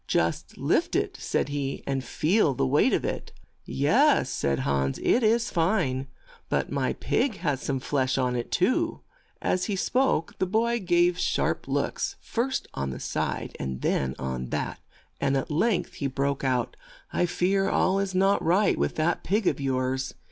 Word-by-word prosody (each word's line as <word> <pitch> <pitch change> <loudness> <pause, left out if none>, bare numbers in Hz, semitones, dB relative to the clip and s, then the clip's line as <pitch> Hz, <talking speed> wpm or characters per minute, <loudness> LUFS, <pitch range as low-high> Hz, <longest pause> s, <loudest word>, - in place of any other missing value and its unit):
"Just 80 0 -1
lift - - +1
it," - - 0
said - - -1
he, 140 -1 -3
"and 135 -1 -1
feel 155 - +2
the 70 - +1
weight 65 - +3
of - - +1
it." - - -4 0.3
"Yes," - - +3
said 70 -1 0
Hans, 70 -1 0
"it 245 - +3
is 230 +1 +2
fine; 165 -7 +1 0.4
but - - 0
my - - 0
pig 260 -7 0
has 145 -6 -1
some 135 -2 -1
flesh 130 0 0
on 125 -2 +1
it 120 - -3
too. 330 - +1 0.4
As 185 - +1
he 205 - -1
spoke 245 - 0
the 190 - +1
boy 230 +4 +1
gave 175 -2 +2
sharp - - 0
looks, - - -1
first 255 +3 -2
on 70 0 -3
this 65 - -6
side - - -2
and 65 -1 -4
then 65 -1 0
on 65 -1 -4
that, - - -3 0.4
and 135 0 +1
at 135 - -3
length 185 +6 +1
he 140 - -2
broke 140 +1 -1
out. 125 -3 0 0.4
"I 175 - +2
fear 195 +3 +1
all 190 +1 +2
is 195 -1 -2
not 195 +2 +3
right 185 +5 +3
with 70 +1 0
that 165 +2 0
pig 210 +2 0
of 145 - +1
yours. 130 0 -1
150 Hz, 175 wpm, -26 LUFS, 130-195 Hz, 0.4 s, weight